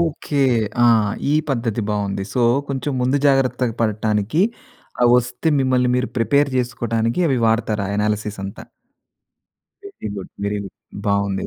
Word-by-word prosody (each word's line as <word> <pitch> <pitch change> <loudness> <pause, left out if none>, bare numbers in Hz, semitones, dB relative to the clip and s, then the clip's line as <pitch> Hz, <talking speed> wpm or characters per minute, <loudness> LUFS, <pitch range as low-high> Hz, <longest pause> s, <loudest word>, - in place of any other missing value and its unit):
Okay. 150 -3 0 0.4
ఆ! - - +6 0.5
ఈ - - +3 0.2
పద్ధతి 115 -3 -1
బాగుంది. 100 -2 -2
సో 125 - +2 0.3
కొంచెం 135 +1 -2
ముందు 130 +3 +2
జాగ్రత్త 130 -3 +2
పడటానికి 110 - +1 0.6
ఆహ్, 120 - +6
వస్తే 125 +6 -1
మిమ్మల్ని 130 -1 +2
మీరు 125 0 -1
ప్రిపేర్ 140 +4 +2
జేసుకోడానికి 120 +1 -1
అవి 135 -3 +1
వాడతారు. 110 -2 +1
ఆ - - -4
అనాలసిస్ 105 0 -1
అంతా. 95 - -8 1.3
Very 380 - -7
good. 95 - -7
Very 105 0 -1
good. 95 - -11 0.3
బావుంది. 100 -1 0
115 Hz, 135 wpm, -20 LUFS, 105-130 Hz, 1.3 s, ఆ